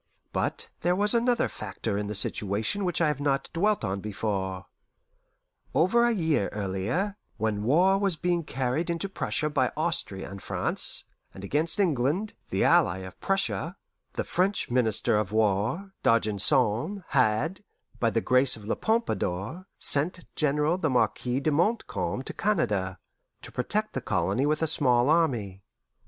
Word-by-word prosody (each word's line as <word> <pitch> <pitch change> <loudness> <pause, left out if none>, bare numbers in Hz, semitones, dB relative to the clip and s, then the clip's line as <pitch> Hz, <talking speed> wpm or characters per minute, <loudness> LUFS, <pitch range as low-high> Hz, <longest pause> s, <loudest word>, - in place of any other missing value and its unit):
But - - -2
there 175 +1 +1
was 205 +3 +2
another 240 0 +2
factor 100 -1 -5
in 105 0 -2
the 105 - -4
situation 105 - 0
which 175 -2 0
I 165 - +4
have 150 -2 -1
not 140 -1 -1
dwelt 205 - +1
on 100 -1 -2
before. 95 -3 -3 1.1
Over 185 - +4
a 240 - +3
year 160 - +1
earlier, 105 - -2 0.2
when 105 -1 -1
war 180 - +3
was 195 -4 +1
being 175 +1 0
carried 135 +4 -2
into 170 +3 -1
Prussia 165 -4 -2
by 140 -4 +1
Austria 155 - -1
and 100 0 -8
France, - - 0 0.3
and 95 - -9
against 155 - -1
England, 170 - +1 0.2
the - - 0
ally 90 +2 +4
of 95 - -12
Prussia, 195 -2 -1 0.4
the - - -2
French 185 -5 0
Minister 110 -4 +3
of 105 -2 -1
War, 110 - 0
D'Argenson, 115 - +2
had, 135 - +1 0.4
by 115 - +2
the 115 0 0
grace 130 +2 +3
of 110 -2 -12
La 110 - 0
Pompadour, 170 - -2
sent 165 +5 +1
General 150 +3 +1
the 160 - +1
Marquis 125 +1 +1
de 155 - +1
Montcalm 175 - 0
to - - -5
Canada, 105 - 0 0.5
to - - -8
protect 215 +12 -2
the - - -3
colony 95 +8 0
with 155 +2 +1
a - - +2
small 130 -3 +3
army. 120 - +1
140 Hz, 150 wpm, -27 LUFS, 105-175 Hz, 1.1 s, I